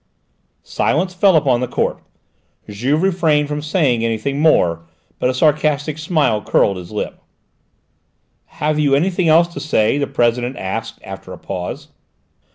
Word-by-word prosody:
Silence 185 Hz, 0 st, -1 dB
fell 185 Hz, 0 st, +4 dB
upon 135 Hz, -6 st, +3 dB
the 125 Hz, -, -2 dB
court; -, -, -1 dB, 0.7 s
Juve 130 Hz, -, -1 dB
refrained 165 Hz, -6 st, +2 dB
from 150 Hz, 0 st, -3 dB
saying 150 Hz, -7 st, +1 dB
anything 115 Hz, +5 st, -2 dB
more, 90 Hz, -, +3 dB, 0.4 s
but 125 Hz, -, +1 dB
a -, -, 0 dB
sarcastic 150 Hz, +1 st, +1 dB
smile 155 Hz, -9 st, +1 dB
curled 100 Hz, -1 st, +1 dB
his 90 Hz, -1 st, -9 dB
lip. 105 Hz, -, -5 dB, 1.2 s
"Have 150 Hz, 0 st, -2 dB
you 140 Hz, -2 st, +3 dB
anything 175 Hz, +3 st, +1 dB
else 165 Hz, +2 st, +5 dB
to 170 Hz, -, -8 dB
say?" 135 Hz, -3 st, +1 dB
the 140 Hz, -, -1 dB
President 120 Hz, -1 st, 0 dB
asked 110 Hz, +4 st, -4 dB
after 95 Hz, -1 st, -9 dB
a -, -, -9 dB
pause. 90 Hz, -2 st, -6 dB
140 Hz, 145 wpm, -18 LUFS, 115-155 Hz, 1.2 s, else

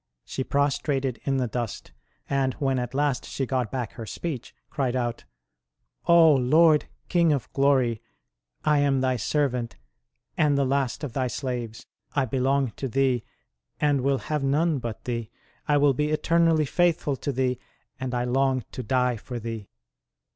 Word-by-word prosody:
She 130 Hz, -, -3 dB
prostrated 140 Hz, -2 st, 0 dB
in 135 Hz, -1 st, +1 dB
the 130 Hz, -, +1 dB
dust; 120 Hz, -, -4 dB, 0.4 s
and 135 Hz, -2 st, 0 dB
when 135 Hz, -3 st, 0 dB
at 125 Hz, +1 st, -4 dB
last 145 Hz, -2 st, +1 dB
she 135 Hz, -, -3 dB
got 125 Hz, -3 st, -1 dB
back 125 Hz, -5 st, -3 dB
her 115 Hz, -3 st, -8 dB
speech, 145 Hz, -4 st, -5 dB, 0.2 s
cried 130 Hz, -3 st, -1 dB
out: 120 Hz, -2 st, -2 dB, 0.4 s
" -, -, -47 dB
O 170 Hz, -2 st, +7 dB
Lord, 150 Hz, +4 st, +4 dB, 0.2 s
King 170 Hz, -2 st, +3 dB
of 140 Hz, -5 st, -2 dB
glory, 130 Hz, -5 st, +2 dB, 0.6 s
I 150 Hz, -1 st, +4 dB
am 140 Hz, -2 st, +2 dB
Thy 130 Hz, -1 st, +1 dB
servant 125 Hz, -1 st, -1 dB, 0.6 s
and 145 Hz, -2 st, +3 dB
the 140 Hz, -, +2 dB
last 135 Hz, 0 st, 0 dB
of 135 Hz, -6 st, -4 dB
Thy 130 Hz, 0 st, 0 dB
slaves. 120 Hz, -3 st, -4 dB, 0.3 s
I 140 Hz, -2 st, +2 dB
belong 135 Hz, +1 st, +1 dB
to 135 Hz, -, -3 dB
Thee, 130 Hz, -1 st, +1 dB, 0.6 s
and 145 Hz, -3 st, +2 dB
will 135 Hz, +1 st, +2 dB
have 150 Hz, +1 st, -3 dB
none 150 Hz, +2 st, +2 dB
but 115 Hz, -3 st, -6 dB
Thee; 115 Hz, -3 st, -3 dB, 0.4 s
I 145 Hz, -, +4 dB
will 145 Hz, -1 st, +4 dB
be 150 Hz, +3 st, 0 dB
eternally 160 Hz, 0 st, +3 dB
faithful 165 Hz, -2 st, +1 dB
to 140 Hz, -, -2 dB
Thee, 130 Hz, -1 st, 0 dB, 0.4 s
and 130 Hz, -1 st, -3 dB
I 120 Hz, -, 0 dB
long 130 Hz, 0 st, +1 dB
to -, -, -5 dB
die 125 Hz, 0 st, +1 dB
for 120 Hz, +3 st, -7 dB
Thee 115 Hz, -3 st, -6 dB
135 Hz, 165 wpm, -26 LUFS, 125-145 Hz, 0.6 s, O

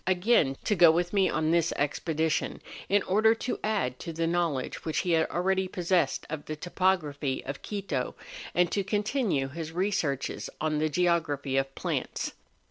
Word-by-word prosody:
291 185 Hz, -1 st, +2 dB, 0.3 s
again 135 Hz, 0 st, -5 dB
to 210 Hz, -, +1 dB
go 175 Hz, -2 st, +8 dB
with 175 Hz, +3 st, +1 dB
me 195 Hz, -2 st, +3 dB
on 160 Hz, 0 st, 0 dB
this 170 Hz, -1 st, +2 dB
expedition, 160 Hz, +2 st, -1 dB, 0.3 s
in 200 Hz, 0 st, +3 dB
order 220 Hz, +4 st, +4 dB
to 245 Hz, -, -3 dB
;add 200 Hz, -, -1 dB
to 165 Hz, -, -5 dB
the 165 Hz, +1 st, -1 dB
knowledge 165 Hz, -6 st, -1 dB
which 160 Hz, -, -2 dB
he 175 Hz, -3 st, +2 dB
already 185 Hz, +4 st, +1 dB
possessed 180 Hz, -1 st, 0 dB
of 155 Hz, -1 st, -5 dB
the 155 Hz, -, -4 dB
topography 155 Hz, -5 st, 0 dB
of 135 Hz, +1 st, -5 dB
Quito, 190 Hz, -11 st, -3 dB, 0.4 s
and 175 Hz, -1 st, +3 dB
to 200 Hz, -, 0 dB
continue 205 Hz, -, 0 dB
his 160 Hz, +2 st, -6 dB
researches 170 Hz, -7 st, -1 dB
on 155 Hz, -1 st, 0 dB
the 155 Hz, 0 st, +1 dB
geography 155 Hz, -5 st, +1 dB
of 135 Hz, 0 st, 0 dB
plants. -, -, -2 dB
170 Hz, 165 wpm, -28 LUFS, 150-190 Hz, 0.4 s, go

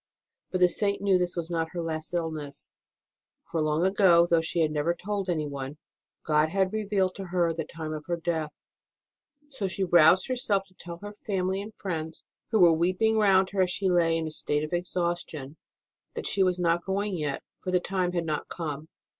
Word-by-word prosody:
But 185 Hz, -, -2 dB
the 180 Hz, -, +8 dB
Saint 200 Hz, +3 st, 0 dB
knew 195 Hz, -2 st, +3 dB
this 180 Hz, 0 st, -1 dB
was 170 Hz, 0 st, -4 dB
not 165 Hz, -1 st, -2 dB
her 175 Hz, -, -3 dB
last 160 Hz, -1 st, -3 dB
illness, 155 Hz, -5 st, -4 dB, 0.8 s
for 165 Hz, -, 0 dB
long 155 Hz, +3 st, +1 dB
ago 190 Hz, -3 st, +5 dB
though 170 Hz, -1 st, +3 dB
she 165 Hz, +1 st, -1 dB
had 155 Hz, -1 st, +2 dB
never 155 Hz, +3 st, 0 dB
told 200 Hz, +1 st, -3 dB
anyone 145 Hz, -3 st, -3 dB, 0.5 s
God 155 Hz, 0 st, +3 dB
had 190 Hz, +2 st, +1 dB
revealed 200 Hz, -3 st, 0 dB
to 195 Hz, -, -5 dB
her 175 Hz, -2 st, +1 dB
the 160 Hz, -1 st, -4 dB
time 155 Hz, -1 st, -6 dB
of 150 Hz, -1 st, -6 dB
her 175 Hz, -1 st, -1 dB
death; 160 Hz, -3 st, -3 dB, 0.9 s
so 220 Hz, -8 st, -2 dB
she 190 Hz, +1 st, -2 dB
roused 175 Hz, +1 st, +5 dB
herself 230 Hz, -6 st, +1 dB
to -, -, -25 dB
tell 170 Hz, -1 st, -8 dB
her 205 Hz, 0 st, -7 dB
family 190 Hz, -2 st, -2 dB
and 210 Hz, +1 st, -9 dB
friends, 160 Hz, -4 st, -5 dB, 0.2 s
who 220 Hz, -, +2 dB
were 170 Hz, -2 st, +7 dB
weeping 185 Hz, +7 st, +2 dB
round 190 Hz, -2 st, +4 dB
her 195 Hz, -1 st, +1 dB
as 185 Hz, -, +2 dB
she 185 Hz, +2 st, 0 dB
lay 165 Hz, -2 st, +3 dB
in 165 Hz, -, -2 dB
a 155 Hz, -, -4 dB
state 150 Hz, -1 st, -1 dB
of 155 Hz, -, -5 dB
exhaustion, 175 Hz, -5 st, -2 dB, 0.6 s
that -, -, -4 dB
she 195 Hz, -, 0 dB
was 185 Hz, -1 st, +3 dB
not 170 Hz, -1 st, +1 dB
going 195 Hz, +1 st, -1 dB
yet, 150 Hz, -4 st, -3 dB, 0.2 s
for 185 Hz, -, -3 dB
the 180 Hz, 0 st, +3 dB
time 180 Hz, -1 st, -1 dB
had 170 Hz, -2 st, -1 dB
not 155 Hz, -2 st, -2 dB
come. 155 Hz, -2 st, -5 dB
175 Hz, 200 wpm, -27 LUFS, 160-190 Hz, 0.9 s, the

